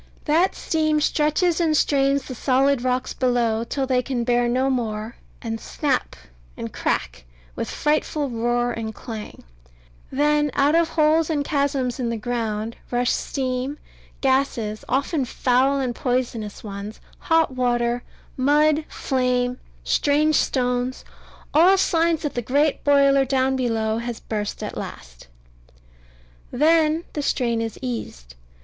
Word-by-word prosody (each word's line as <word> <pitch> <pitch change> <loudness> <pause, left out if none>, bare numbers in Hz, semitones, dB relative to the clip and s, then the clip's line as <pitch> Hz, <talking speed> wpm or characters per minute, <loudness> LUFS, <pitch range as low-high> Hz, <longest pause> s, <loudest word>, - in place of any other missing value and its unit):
That 330 +5 +2
steam 310 -1 +1
stretches 305 +4 +1
and 315 -2 +2
strains 275 -1 +2
the 260 - -7
solid 265 +1 +2
rocks 255 0 -1
below, 235 -3 +1
till 270 +3 -2
they 255 -1 +2
can 250 -1 -2
bear 240 0 +2
no 255 +2 +1
more, 225 -4 -2 0.3
and 225 -1 -4
snap, 280 -5 -1 0.4
and - - -6
crack, - - -2 0.3
with - - -4
frightful 300 -1 0
roar 240 0 0
and 220 -2 -5
clang; 220 -3 -8 0.7
then 295 +1 +2
out 285 +2 +3
of 335 0 +3
holes 315 0 +3
and 290 -3 0
chasms 280 -4 0
in 240 -2 -1
the 230 - -2
ground 225 -1 -3
rush 245 0 +1
steam, 260 +1 -2 0.4
gases 260 -6 0
often 280 +3 0
foul 260 +2 +1
and 255 -3 -1
poisonous 240 -5 -2
ones 205 0 -7 0.2
hot 325 -3 +2
water, 240 -1 0 0.3
mud, 300 +3 +3
flame, 250 -2 0 0.2
strange 300 +2 +2
stones 250 -2 0 0.5
all 355 +6 +6
signs 330 -3 +2
that 295 - -2
the 245 - -2
great 285 +5 +1
boiler 275 -1 +5
down 265 0 +1
below 225 -3 0
has 235 -1 -5
burst 210 -2 -4
at - - -5
last. - - -9 1.2
Then 315 +3 +3
the 295 - -2
strain 235 -5 0
is 225 -1 -4
eased. - - -5
255 Hz, 135 wpm, -23 LUFS, 240-295 Hz, 1.2 s, all